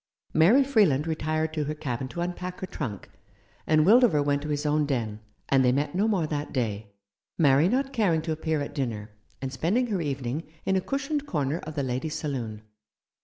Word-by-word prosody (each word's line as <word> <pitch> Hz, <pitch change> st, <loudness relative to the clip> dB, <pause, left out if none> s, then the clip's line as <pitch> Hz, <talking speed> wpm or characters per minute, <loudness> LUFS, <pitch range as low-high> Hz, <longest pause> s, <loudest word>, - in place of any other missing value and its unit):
Mary 195 Hz, -, +6 dB
Freeland 205 Hz, -, +3 dB
retired 155 Hz, 0 st, -1 dB
to 155 Hz, -2 st, -1 dB
her 150 Hz, +2 st, -3 dB
cabin 130 Hz, -3 st, -3 dB
to 170 Hz, -, -5 dB
unpack 180 Hz, +1 st, -4 dB
her -, -, -3 dB
trunk, 120 Hz, -, -5 dB, 0.6 s
and 155 Hz, 0 st, +4 dB
Wildover 210 Hz, -, +5 dB
went 145 Hz, 0 st, +1 dB
to 150 Hz, -, -5 dB
his 145 Hz, 0 st, -1 dB
own 150 Hz, 0 st, +2 dB
den, 115 Hz, -6 st, -2 dB, 0.3 s
and 135 Hz, -1 st, +4 dB
they 125 Hz, -, +4 dB
met 145 Hz, +3 st, 0 dB
no 200 Hz, +4 st, +2 dB
more 195 Hz, -7 st, +1 dB
that 150 Hz, -1 st, -3 dB
day, 105 Hz, -5 st, -3 dB, 0.4 s
Mary 145 Hz, +2 st, +5 dB
not 270 Hz, +4 st, 0 dB
caring 180 Hz, -10 st, +2 dB
to 160 Hz, -, -3 dB
appear 160 Hz, -1 st, -1 dB
at 145 Hz, -, -5 dB
dinner, 115 Hz, -6 st, -3 dB, 0.3 s
and 130 Hz, 0 st, -3 dB
spending 195 Hz, -, +1 dB
her 205 Hz, -7 st, -1 dB
evening 135 Hz, -1 st, -2 dB, 0.2 s
in 190 Hz, -, +2 dB
a 190 Hz, -, +2 dB
cushioned 280 Hz, +5 st, -2 dB
corner 150 Hz, -, -1 dB
of 155 Hz, -1 st, -8 dB
the 140 Hz, -, -1 dB
ladies' 130 Hz, +5 st, -2 dB
saloon. 120 Hz, -8 st, -4 dB
150 Hz, 195 wpm, -27 LUFS, 135-180 Hz, 0.6 s, Mary